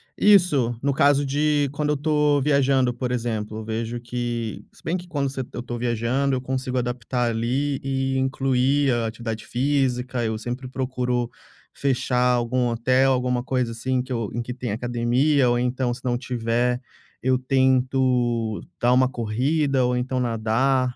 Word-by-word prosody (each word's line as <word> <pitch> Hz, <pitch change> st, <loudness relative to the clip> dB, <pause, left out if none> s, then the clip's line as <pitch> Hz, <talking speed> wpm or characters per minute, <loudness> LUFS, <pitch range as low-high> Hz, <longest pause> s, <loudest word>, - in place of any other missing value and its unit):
Isso. 170 Hz, -, +4 dB
No 140 Hz, 0 st, +1 dB
caso 140 Hz, +1 st, +3 dB
de 145 Hz, +1 st, +1 dB
quando 150 Hz, +1 st, -2 dB
eu 150 Hz, -, +1 dB
tô 150 Hz, -1 st, +2 dB
viajando, 135 Hz, -3 st, +2 dB
por 125 Hz, +1 st, -3 dB
exemplo, 110 Hz, -3 st, -3 dB
vejo 115 Hz, +2 st, -3 dB
que 120 Hz, -2 st, -4 dB
se -, -, -22 dB
bem 165 Hz, -, -1 dB
que 180 Hz, 0 st, -10 dB
quando 145 Hz, -5 st, -1 dB
você 135 Hz, 0 st, -4 dB
eu -, -, -4 dB
tô 120 Hz, -1 st, -5 dB
viajando 120 Hz, +3 st, 0 dB
eu 125 Hz, -, -2 dB
consigo 130 Hz, 0 st, -3 dB
adaptar 120 Hz, 0 st, -1 dB
ali 130 Hz, +5 st, -1 dB
e 135 Hz, 0 st, -1 dB
incluir 135 Hz, +1 st, +2 dB
a 115 Hz, -1 st, 0 dB
atividade 110 Hz, 0 st, -5 dB
física. 130 Hz, -2 st, 0 dB
Eu 110 Hz, -1 st, -1 dB
sempre 125 Hz, +4 st, -5 dB
procuro 125 Hz, -2 st, -2 dB, 0.4 s
fechar 125 Hz, -2 st, +1 dB
algum 120 Hz, +1 st, +1 dB
hotel, 130 Hz, +3 st, +2 dB
alguma 125 Hz, -1 st, 0 dB
coisa 125 Hz, -2 st, -1 dB
assim 125 Hz, +3 st, -1 dB
que 130 Hz, +1 st, -9 dB
eu 115 Hz, -4 st, -2 dB
em 120 Hz, -, -2 dB
que 125 Hz, +1 st, -5 dB
tenha 120 Hz, -4 st, -4 dB
academia 120 Hz, +4 st, +2 dB
ou, 120 Hz, -, +2 dB
então, 125 Hz, 0 st, 0 dB
se 125 Hz, -, -10 dB
não 120 Hz, -1 st, 0 dB
tiver, 120 Hz, 0 st, -1 dB, 0.4 s
eu 130 Hz, 0 st, +2 dB
tento 130 Hz, -3 st, +1 dB, 0.2 s
dar 120 Hz, +1 st, +3 dB
uma 130 Hz, 0 st, +4 dB
corrida 130 Hz, +4 st, 0 dB
ou 125 Hz, 0 st, +1 dB
então 125 Hz, +1 st, -1 dB
nadar. 125 Hz, +2 st, +1 dB
125 Hz, 165 wpm, -23 LUFS, 120-135 Hz, 0.4 s, Isso